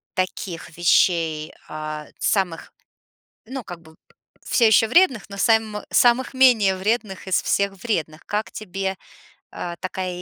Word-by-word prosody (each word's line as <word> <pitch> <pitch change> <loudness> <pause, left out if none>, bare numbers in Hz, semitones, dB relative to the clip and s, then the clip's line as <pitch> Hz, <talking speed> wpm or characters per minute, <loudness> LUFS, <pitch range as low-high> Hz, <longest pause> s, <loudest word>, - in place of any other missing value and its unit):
таких 180 -3 -4
вещей, 165 -3 +2
а-а, 155 0 -6
самых, 185 -5 -1 0.7
ну 260 +2 -6
как 175 -4 -9
бы 160 -1 -17 0.5
в - - -10
всё 235 - +5
ещё 220 +1 +5
вредных, 275 - +4
но 200 - -8
сам 220 0 +2
самых 250 +2 +3
менее 230 -7 +5
вредных 200 0 -2
из 185 - +2
всех 200 0 +1
вредных. 160 -9 -2
Как 210 +1 -2
тебе, 195 -2 -4 0.6
э-э, 175 -1 -5
такая 185 -1 -4
195 Hz, 135 wpm, -22 LUFS, 175-220 Hz, 0.7 s, всё